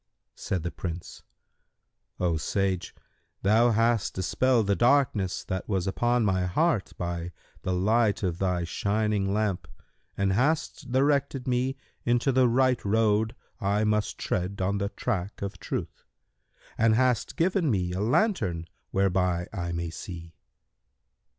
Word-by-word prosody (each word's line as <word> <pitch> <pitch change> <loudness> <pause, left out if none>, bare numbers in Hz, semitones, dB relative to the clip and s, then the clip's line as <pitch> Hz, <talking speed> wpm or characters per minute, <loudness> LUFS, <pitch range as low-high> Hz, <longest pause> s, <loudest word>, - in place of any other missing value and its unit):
Said 90 -4 -3
the 85 - -3
Prince, 85 -1 -6 1.0
"O 90 -2 +1
sage, 95 +3 -1 0.5
thou 110 +4 +5
hast 115 -1 +2
dispelled 115 +5 +2
the 100 0 +2
darkness 120 -7 +2
that 95 +2 -4
was 95 -3 0
upon 120 +4 +1
my 95 -2 +1
heart 150 - +1
by 85 0 -3 0.3
the 95 - -2
light 105 +4 +2
of 90 -2 -1
thy 90 -2 0
shining 100 +2 0
lamp 105 -3 -1 0.5
and 100 -1 +1
hast 130 +3 0
directed 135 0 +1
me 130 +1 +1 0.3
into 120 +3 +2
the 130 -1 +4
right 130 +1 +2
road 110 +1 +2 0.2
I 100 +2 +1
must 105 -1 0
tread 95 +2 -2
on 100 +2 0
the 100 0 -1
track 100 -4 -3
of 100 -1 -5
Truth - - -5 0.8
and 110 0 +4
hast 125 -2 +1
given 180 -1 +1
me 90 -6 0
a 95 - -2
lantern 105 - +1 0.2
whereby 90 -2 +1
I 85 -3 -3
may 85 -1 -3
see." 85 -3 -8
100 Hz, 135 wpm, -27 LUFS, 90-120 Hz, 1.0 s, thou